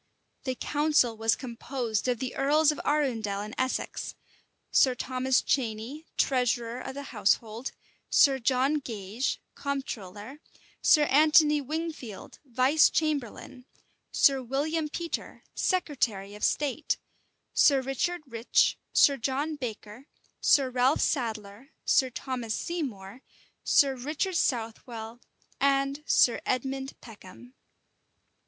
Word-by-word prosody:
The 260 -1 -1
council 295 -5 +1
was 225 0 +2
composed 240 -2 -3
of 250 -1 +1
the 255 +2 -5
earls 300 +3 +3
of 300 - -6
Arundel 230 -9 0
and 210 +1 -7
Essex; 260 0 -3 0.6
Sir 255 -2 +4
Thomas 255 +1 0
Cheney, 250 +5 -2
treasurer 245 -2 0
of 265 - -7
the 280 - -5
household; 220 +3 0 0.4
Sir 270 -2 +5
John 260 +4 +2
Gage, 220 -1 -3
comptroller; 250 -3 -5 0.4
Sir 300 - +5
Anthony 300 +1 +5
Wingfield, 300 - -6
vice 265 +3 +4
chamberlain; 270 -4 -3 0.5
Sir 270 -2 +4
William 300 +5 -1
Petre, 335 +2 -5
secretary 240 - -1
of 210 - -10
state; 295 +1 0 0.6
Sir 280 -2 +5
Richard 270 +6 -2
Rich, 235 -2 +1
Sir 280 -1 +5
John 280 +6 -2
Baker, 235 -1 -7 0.3
Sir 270 -3 +4
Ralph 255 +3 +2
Sadler 225 0 -3
Sir 260 -2 +3
Thomas 245 -3 -4
Seymour, 250 - -5 0.4
Sir 275 -2 +4
Richard 300 +9 -3
Southwell, 230 -2 -3 0.4
and 275 +1 +1
Sir 240 - +4
Edmund 265 +2 -3
Peckham. 225 +2 -13
260 Hz, 110 wpm, -28 LUFS, 230-285 Hz, 0.6 s, Sir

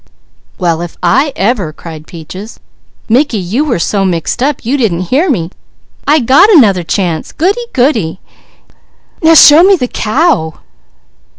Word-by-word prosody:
"Well 170 -3 -1
if 175 -1 -8
I 270 - +1
ever!" 200 -6 -1
cried 155 0 -11
Peaches. 185 +6 -10 0.5
"Mickey, 250 +1 +1
you 200 +9 -2
was 240 - -1
so 200 -2 -1
mixed 180 +5 -2
up 275 -2 -2
you 255 +5 0
didn't 185 -9 -2
hear 310 +8 +1
me. 180 - -2 0.6
I 300 +2 +4
got 275 - +4
'nother 200 - +4
chance. 170 -2 -3
Goody, 405 +9 -2
goody! 225 - -1 1.0
Now 325 0 +4
show 300 +1 +7
me 390 +2 +5
the 250 -8 -3
cow!" 230 - -1
225 Hz, 140 wpm, -11 LUFS, 175-290 Hz, 1.0 s, show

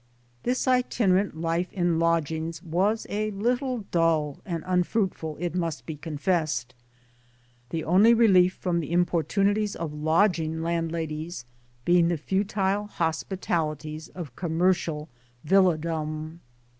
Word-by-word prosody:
This 255 +2 -1
itinerant 205 -8 +2
life 165 +2 -1
in 175 -3 +1
lodgings 165 0 0
was 195 +6 0
a 215 +1 -1
little 245 +3 -1
dull 160 -4 +1
and 165 -3 -3
unfruitful 180 -3 0
it 175 -1 -2
must 170 -4 -2
be 160 - -5
confessed'; 150 -4 -1 1.0
the 165 -1 -3
only 195 +8 +5
relief 190 -6 +5
from 175 -2 -1
the 160 -1 -5
importunities 195 +4 +1
of 160 -3 -4
lodging 160 +1 +1
landladies 165 -3 -3 0.4
being 175 -1 +4
the 170 -1 0
futile 195 +4 0
hospitalities 160 -3 -2
of 155 -9 -9
commercial 170 -2 0 0.4
villa 185 0 +4
dom. 155 0 -4
170 Hz, 115 wpm, -26 LUFS, 160-190 Hz, 1.0 s, only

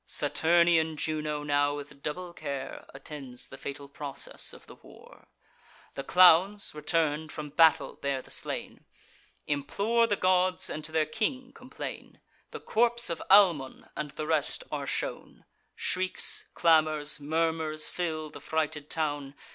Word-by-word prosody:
Saturnian 165 -1 +2
Juno 150 -1 -2
now, 145 0 +1
with 145 -1 -9
double 175 +4 -5
care, 140 -5 -6
Attends 135 -2 -8
the 135 - -10
fatal 140 0 -7
process 140 -1 -3
of - - -13
the - - -13
war. - - -17 0.7
The 135 - -5
clowns, 185 +4 +5
return'd, 155 0 0
from 150 -1 -6
battle 160 +1 +4
bear 140 -2 -2
the - - -15
slain, - - -4 0.6
Implore 210 +11 +1
the 205 - +1
gods, 185 -1 +2
and 155 - -5
to 155 - -7
their 160 -1 +2
king 250 - -3
complain. 255 0 -8 0.3
The - - -8
corps 235 -2 +2
of 165 - -4
Almon 175 -10 +4
and 150 -1 -4
the 155 +2 -6
rest 155 -2 0
are - - -3
shown; - - -5 0.3
Shrieks, 185 0 -1
clamours, 155 -3 +3
murmurs, 160 0 0
fill 155 -3 -3
the - - -11
frighted 155 -2 -2
town. 145 -3 -2
155 Hz, 140 wpm, -29 LUFS, 145-175 Hz, 0.7 s, clowns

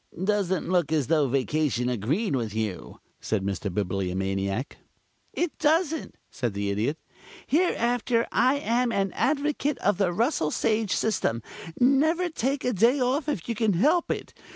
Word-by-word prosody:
"Doesn't 195 -2 0
look 175 -4 +1
as 155 -4 +2
though 150 -1 +2
vacation 135 -1 0
agreed 135 - 0
with 115 -4 -3
you," 110 -4 -4 0.2
said 100 -3 -2
the 100 +1 -2
Bibliomaniac. 95 +4 -2 0.5
"It 345 -2 -2
doesn't," 320 0 +1 0.2
said 120 -7 -3
the 100 0 -1
Idiot. 115 +10 -1 0.5
"Hereafter 245 -7 +1
I 260 +2 +3
am 245 -3 0
an 195 -3 0
advocate 290 +2 0
of 205 0 0
the 190 -3 +2
Russell 225 - +1
Sage 215 +3 0
system. 120 - 0 0.4
Never 315 +8 +3
take 275 -2 -2
a 250 - +1
day 235 +8 +3
off 270 +5 0
if 195 - -3
you 235 - -1
can 220 -2 +1
help 305 - +2
it. - - -4
200 Hz, 150 wpm, -26 LUFS, -, 0.5 s, I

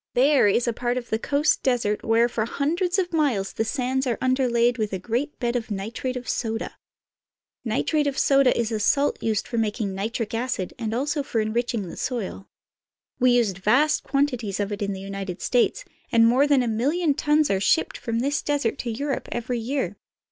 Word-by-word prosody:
There 270 -1 +5
is 235 +4 +2
a 235 - +1
part 245 +1 -1
of 245 -1 -6
the 220 - +1
coast 290 +5 +1
desert 235 -5 0
where 230 +1 +3
for 220 -2 -2
hundreds 345 - -1
of 360 -2 -1
miles 260 -12 +1
the - - 0
sands 260 +2 -1
are 235 - 0
underlaid 245 -2 +2
with 215 -2 -1
a - - 0
great 240 +10 -3
bed 240 -1 -1
of 235 -2 -2
nitrate 220 +5 -4
of 245 - -8
soda. 225 -1 -3 0.9
Nitrate 285 +6 0
of 275 - -2
soda 275 -2 +4
is 230 -1 0
a 220 - -1
salt 280 +7 +1
used 220 -2 -1
for 235 - -2
making 210 -2 -1
nitric 220 +3 -3
acid 230 -5 -2
and 225 -1 -2
also 285 +4 0
for 245 -4 -2
enriching 220 -1 -1
the - - -9
soil. 225 -6 -4 0.7
We 250 0 +4
use 230 -5 +2
vast 230 +11 +2
quantities 250 -9 -1
of 205 0 -1
it 205 - -4
in 200 0 -1
the 190 - -6
United 195 -1 -6
States, 255 - +1 0.3
and 230 0 +5
more 255 +5 +4
than 280 -3 +4
a - - -2
million 285 +9 +1
tons, 300 -1 +2
are 195 - +1
shipped 320 +10 +2
from 230 0 -2
this 280 +2 0
desert 285 -6 -1
to 240 - -3
Europe 275 +5 -3
every 240 +1 -2
year. 260 +4 -2
240 Hz, 200 wpm, -24 LUFS, 220-275 Hz, 0.9 s, There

